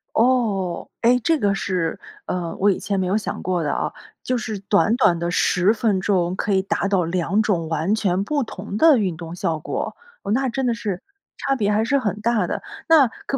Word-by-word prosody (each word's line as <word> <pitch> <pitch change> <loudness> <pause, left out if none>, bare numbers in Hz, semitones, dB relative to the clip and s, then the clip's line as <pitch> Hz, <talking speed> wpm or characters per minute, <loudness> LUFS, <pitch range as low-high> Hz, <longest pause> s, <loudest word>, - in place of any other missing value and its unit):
哦， 220 -7 +1
哎， 245 +2 +4
这 325 -1 +3
个 205 -4 +1
是， 180 -4 -2 0.3
呃， 175 -2 -3
我 205 +1 +4
以 - - -2
前 200 -2 -2
没 185 - 0
有 195 +4 +1
想 215 - -4
过 180 -2 0
的 145 - 0
啊。 - - -2 0.3
就 255 -1 0
是 220 -3 -4
短 205 +3 +2
短 175 -9 +4
的 170 +1 -2
10 180 +4 +3
分 210 -4 0
钟， 185 -3 +1
可 205 - -2
以 190 - +3
达 195 0 -1
到 195 -3 +2
2 180 +4 0
种 175 -7 0
完 160 +5 0
全 195 -3 0
不 285 +2 0
同 200 -2 -7
的 315 +2 +6
运 190 -6 0
动 165 +1 -8
效 165 -2 -1
果。 - - -4 0.3
哦， 200 - -3
那 260 +2 +1
真 265 +2 -2
的 240 - +2
是 205 -5 -4 0.4
差 275 - 0
别 210 -4 0
还 210 +1 +2
是 280 +5 +2
很 210 -7 -2
大 225 -3 +1
的。 - - -3 0.3
那 310 -5 +7
可 275 +4 -5
200 Hz, 225 characters per minute, -22 LUFS, 180-230 Hz, 0.4 s, 那